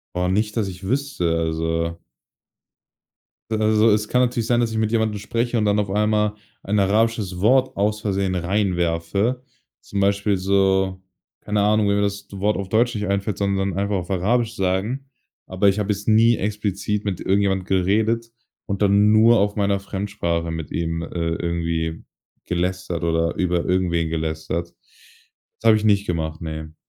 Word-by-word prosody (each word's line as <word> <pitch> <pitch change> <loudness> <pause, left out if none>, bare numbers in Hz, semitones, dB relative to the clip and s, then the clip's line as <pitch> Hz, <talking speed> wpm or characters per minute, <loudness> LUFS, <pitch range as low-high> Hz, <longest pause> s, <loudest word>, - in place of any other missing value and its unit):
Oh, 90 0 0
nicht, 105 +4 0
dass 105 -3 0
ich 95 0 -8
wüsste, 110 -8 -1
also 80 +1 -1 1.5
Also, 110 0 +3
es 105 0 +1
kann 125 - +3
natürlich 120 -2 0
sein, 120 -1 +2
dass 115 -2 0
ich 110 - -3
mit 110 -1 0
jemandem 110 -2 0
spreche 115 +3 -1
und 110 - +1
dann 105 0 +2
auf 100 -2 -1
einmal 105 +1 +1 0.3
ein 105 +1 0
arabisches 105 -2 +1
Wort 130 +6 +3
aus 105 +2 0
Versehen 95 -3 -1
reinwerfe. 95 +4 0 0.4
Zum 100 - -4
Beispiel 100 +1 +2
so, 95 0 +1 0.4
keine 105 -1 -1
Ahnung, 105 0 +3
wenn 100 - +2
mir 100 - +1
das 100 0 -2
d 100 - -9
Wort 105 +2 +1
auf 100 -1 -4
Deutsch 115 +4 +2
nicht 105 0 -2
einfällt, 100 0 -1
sondern 100 -2 -1
einfach 100 +1 0
auf 90 0 -3
Arabisch 115 +5 +1
sagen. 105 +8 -1 0.4
Aber 95 +2 +2
ich 100 +2 0
habe 105 0 +1
jetzt 105 +2 -4
nie 115 +2 +5
explizit 105 0 -2
mit 95 -4 -3
irgendjemand 95 -1 +1
geredet 110 +5 +1 0.3
und 100 -1 -4
dann 100 +1 +4
nur 115 +2 +6
auf 100 +1 +1
meiner 100 -1 +1
Fremdsprache 95 -4 -3
mit 80 -2 -6
ihm, 80 0 -2
äh, - - -6 0.3
irgendwie 85 -1 -2 0.4
gelästert 90 -1 -2
oder 85 0 +1
über 90 -2 0
irgendwen 85 -3 0
gelästert. 80 +1 -3 0.9
Das 115 - +1
habe 110 - +6
ich 110 - -3
nicht 100 -1 +3
gemacht, 80 -2 -3
ne. 80 -1 -6
100 Hz, 165 wpm, -22 LUFS, 90-105 Hz, 1.5 s, nur